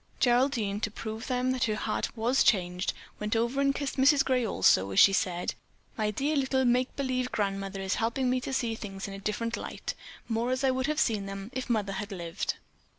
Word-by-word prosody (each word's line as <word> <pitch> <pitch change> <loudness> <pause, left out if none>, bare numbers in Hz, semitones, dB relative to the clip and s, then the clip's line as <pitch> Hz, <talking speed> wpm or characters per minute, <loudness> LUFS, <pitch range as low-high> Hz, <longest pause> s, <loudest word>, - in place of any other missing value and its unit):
Geraldine, 240 -5 +2
to 215 - -1
prove 220 +1 -6
to - - -7
them 255 0 +1
that 255 0 +1
her 215 -2 0
heart 215 +2 -2
was 240 +4 +2
changed, 180 -3 +1 0.3
went 210 +1 -1
over 235 +4 +1
and 275 0 +2
kissed 285 -1 -3
Mrs. 275 +1 +5
Gray 255 -2 +2
also 95 - +3
as 95 - +2
she 195 - +8
said: 180 -2 0 0.4
"My 215 -1 0
dear 280 +8 0
little 265 -1 +1
Make 250 +1 +2
believe 255 -2 -1
Grandmother 195 -1 -2
is 190 0 -1
helping 245 +3 0
me 255 0 +1
to 270 - -4
see 240 -3 0
things 200 -3 -6
in 195 - -7
a 195 - -7
different 230 +3 -2
light, - - -5 0.3
more 230 +1 0
as 255 +1 -1
I 265 - +4
would 260 +1 -1
have 305 0 0
seen 210 -7 +1
them 195 +3 -6
if 260 -1 -4
Mother 210 -4 0
had 205 +2 -5
lived." 170 -3 -3
230 Hz, 215 wpm, -29 LUFS, 200-255 Hz, 0.4 s, she